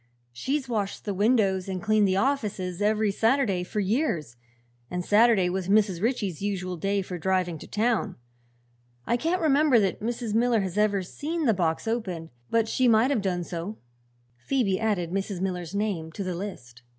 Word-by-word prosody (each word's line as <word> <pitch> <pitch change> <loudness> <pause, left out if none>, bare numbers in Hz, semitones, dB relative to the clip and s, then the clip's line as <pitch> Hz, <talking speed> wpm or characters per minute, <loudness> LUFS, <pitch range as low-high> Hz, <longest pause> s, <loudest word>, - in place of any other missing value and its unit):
She's 265 - -2
washed 210 -5 -3
the 205 - -1
windows 200 -3 +2
and 185 -1 -2
cleaned 215 +1 +3
the 190 0 +1
offices 200 -7 -1
every 215 0 +2
Saturday 225 -4 +1
for 210 - -4
years, 195 - -1 0.5
and 180 0 -3
Saturday 210 -3 +4
was 180 0 -2
Mrs. 200 -3 +2
Ritchie's 210 - -1
usual 185 -3 -2
day 195 +3 -1
for 180 -1 -6
driving 180 -2 0
to - - -10
town. 220 -2 0 0.9
I - - +1
can't 335 +8 0
remember 290 -4 +4
that 195 -3 0
Mrs. 230 -1 -3
Miller 230 -1 +3
has 190 -2 -4
ever 205 -2 +2
seen 315 - -3
the 230 - +4
box 170 +1 -1
opened, 185 - -3 0.2
but 225 -1 +2
she 255 +3 +2
might 230 +3 +4
have 250 -7 +1
done 180 -3 -1
so." 175 +5 -5 0.6
Phoebe 195 - 0
added 200 -7 0
Mrs. 195 0 -2
Miller's 180 -1 -3
name 195 -6 -2
to 200 - -4
the 185 -1 -3
list. 145 -11 -7
200 Hz, 175 wpm, -26 LUFS, 185-230 Hz, 0.9 s, Saturday